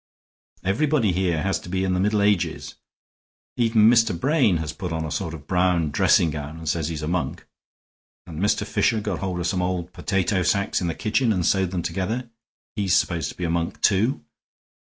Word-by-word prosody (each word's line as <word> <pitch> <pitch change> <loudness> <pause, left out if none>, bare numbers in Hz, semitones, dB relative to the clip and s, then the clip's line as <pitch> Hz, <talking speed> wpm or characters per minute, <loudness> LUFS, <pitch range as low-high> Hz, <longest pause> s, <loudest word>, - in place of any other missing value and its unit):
"Everybody 115 +3 +1
here 90 -3 0
has 95 0 0
to - - -11
be 95 +1 -1
in 95 -1 0
the 90 - 0
Middle 105 +1 +2
Ages. 100 -3 0 0.8
Even 115 -3 +4
Mr. 115 -6 +4
Brain 135 - +3
has 75 -2 -4
put 90 +1 -5
on 80 -1 -2
a 80 - -5
sort 85 -4 -3
of 75 -2 -12
brown 90 -4 +1
dressing 80 +3 +3
gown 75 +1 -6
and 80 -1 -9
says 80 0 0
he's 80 -2 -4
a - - -2
monk; 90 0 -2 0.8
and 80 -3 -8
Mr. 100 +3 +1
Fisher 110 - +1
got 105 -4 -3
hold 95 -2 -3
of 85 - -2
some 90 +1 0
old 90 -1 -3
potato 95 0 0
sacks 100 +4 +1
in 90 - -1
the 85 - -2
kitchen 115 +2 +1
and 90 -5 0
sewed 95 -2 +2
them 90 -2 -3
together; 105 +8 -3 0.4
he's 100 -4 +1
supposed 85 -5 0
to - - -10
be 90 - -5
a 85 - 0
monk, 85 0 -2
too. 100 - +2
90 Hz, 200 wpm, -23 LUFS, 85-105 Hz, 0.8 s, Even